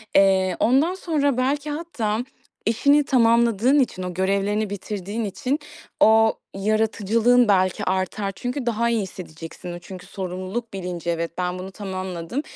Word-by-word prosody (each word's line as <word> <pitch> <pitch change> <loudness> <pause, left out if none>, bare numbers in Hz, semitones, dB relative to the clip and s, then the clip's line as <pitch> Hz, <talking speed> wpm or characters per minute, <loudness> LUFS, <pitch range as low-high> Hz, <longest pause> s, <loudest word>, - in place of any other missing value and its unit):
eee, 190 -2 +4
ondan 275 +9 +3
sonra 290 -8 0
belki 280 +3 0
hatta 290 -9 -2 0.5
işini 280 +7 +4
tamamladığın 235 +1 +4
için, 220 -8 0
o 180 0 -4
görevlerini 200 +3 0
bitirdiğin 205 +2 -4
için 255 +8 -2 0.4
o 220 0 +6 0.2
yaratıcılığın 220 +3 +2
belki 185 -3 +2
artar. 190 +2 -1
Çünkü 250 +4 -4
daha 235 0 +1
iyi 230 -2 +1
hissedeceksin. 175 -2 -8
O 175 - -7
çünkü 185 +1 -10
sorumluluk 190 +4 -5
bilinci, 180 -3 -4
"Evet, 170 0 -1
ben 180 0 -2
bunu 190 +1 -7
tamamladım. 185 - -4
210 Hz, 135 wpm, -23 LUFS, 185-240 Hz, 0.5 s, o